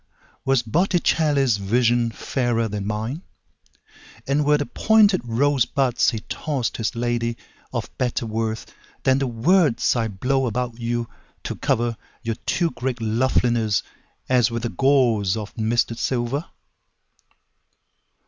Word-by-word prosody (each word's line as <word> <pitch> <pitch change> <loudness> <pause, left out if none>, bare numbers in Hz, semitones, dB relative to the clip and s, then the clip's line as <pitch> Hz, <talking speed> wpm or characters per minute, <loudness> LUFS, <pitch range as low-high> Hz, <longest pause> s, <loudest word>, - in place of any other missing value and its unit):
Was 135 -3 +2
Botticelli's 145 - +2
visionFairer 120 +2 +1
than 100 -1 -3
mine; 110 +9 -3 1.0
And 140 +2 +1
were 150 +1 +4
the 145 - -2
pointed 215 -1 +4
rosebudsHe 125 -2 +1
tossed 140 -7 -2
his 115 +2 -2
ladyOf 120 0 -3
better 125 -2 -1
worthThan 110 +4 -2
the 135 - 0
words 140 +5 +2
I 115 -2 0
blow 130 +6 0
about 120 0 -3
youTo 120 0 -5
cover 120 0 +1 0.3
your 115 -1 -2
too 170 -2 +1
great 125 0 -3
lovelinessAs 120 +1 0
with 115 0 -3
a - - -1
gauzeOf 115 -7 +1
misted 115 +1 0
silver? 130 +5 -1
120 Hz, 100 wpm, -23 LUFS, 115-135 Hz, 1.0 s, were